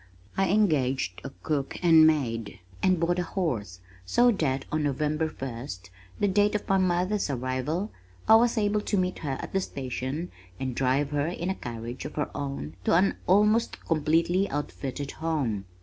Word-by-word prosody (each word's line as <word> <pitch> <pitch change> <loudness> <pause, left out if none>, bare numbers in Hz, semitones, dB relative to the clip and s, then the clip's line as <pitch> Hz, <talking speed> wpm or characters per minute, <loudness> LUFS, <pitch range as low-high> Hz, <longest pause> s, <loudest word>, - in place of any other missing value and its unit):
I 195 -1 +2
engaged 135 - +1
a - - -5
cook 140 -3 -1
and 160 -2 +7
maid, 115 -9 -1 0.2
and 185 -2 +3
bought 175 +2 +1
a - - +1
horse 120 - -3 0.2
so 240 - +4
that 135 - -1
on 155 - 0
November 150 +2 0
first, 120 - -7 0.3
the 205 - +3
date 205 +2 +3
of 210 - -2
my 195 0 +3
mother's 185 +1 +1
arrival, 130 - -2 0.4
I - - +7
was 235 +1 +2
able 210 0 +2
to 205 - -1
meet 185 0 0
her 135 -4 -3
at - - -7
the 195 - +2
station 135 +2 -4 0.3
and 130 -1 -2
drive 135 +3 +1
her 145 0 0
in 175 +1 -2
a - - 0
carriage 120 -2 -6
of 150 - -7
her 150 - -3
own 135 - -5
to - - +4
an 190 +3 +3
almost 210 +4 +3
completely 165 +4 +2
outfitted 140 -1 -4
home. 140 -12 -2
155 Hz, 170 wpm, -27 LUFS, 130-185 Hz, 0.4 s, and